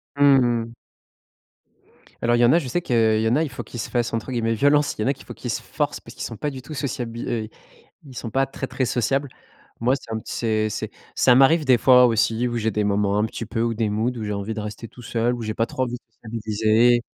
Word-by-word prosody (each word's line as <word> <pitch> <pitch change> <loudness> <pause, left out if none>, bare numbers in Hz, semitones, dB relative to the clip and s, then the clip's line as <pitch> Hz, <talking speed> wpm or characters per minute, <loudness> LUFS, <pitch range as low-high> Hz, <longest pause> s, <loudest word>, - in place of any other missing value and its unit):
Mmh 140 -2 +6 0.3
mh. - - -13 1.5
Alors 120 0 +3
il - - +1
y 120 - +6
en 120 - +5
a, 170 - +5
je 140 - -6
sais 175 +8 -1
que 115 -6 +2
il - - 0
y - - +2
en 115 - +3
a, 155 - +2
il 155 - -3
faut 125 - -7
qu'ils 120 - -9
se - - -4
fassent, 120 -2 -1
entre 115 +3 -3
guillemets, 115 -2 0
violence. 145 +5 +3
Il - - -3
y - - 0
en - - +1
a 140 - +3
qu'il - - -16
faut - - -8
qu'ils - - -5
se - - -3
forcent - - -3
parce - - -13
qu'ils - - -6
sont 115 - -6
pas 150 - -2
du 130 -2 -8
tout 155 +4 -9
sociabil 120 -4 -4
heu, 110 -2 -2 0.6
ils 130 - -12
sont 115 - -5
pas 135 +3 +1
très 135 - -6
très 130 - -2
sociables. 135 +4 0 0.5
Moi, 125 +3 +3
c'est 115 - -10
un 110 - -2
c'est 110 -2 -1
c'est - - -4 0.2
ça 125 - +5
m'arrive 145 +5 +5
des 130 -3 +5
fois 125 0 +7
aussi, 115 +1 +1
où 120 - -3
j'ai 110 0 0
des 105 0 -1
moments 100 0 +1
un 105 - +2
petit 115 - -6
peu 115 - -3
ou 115 -1 0
des 110 -1 0
moods 110 +4 0
où 110 - -4
j'ai 105 - -3
envie 100 +2 -3
de 110 - -4
rester 105 +2 -7
tout 125 - -14
seul, 120 +1 0
où 120 - -6
j'ai 110 -1 -3
pas 115 - 0
trop 130 - -3
envie 125 -1 -2
de 125 - -6
sociabiliser 110 +2 +2
120 Hz, 275 wpm, -23 LUFS, 110-130 Hz, 1.5 s, fois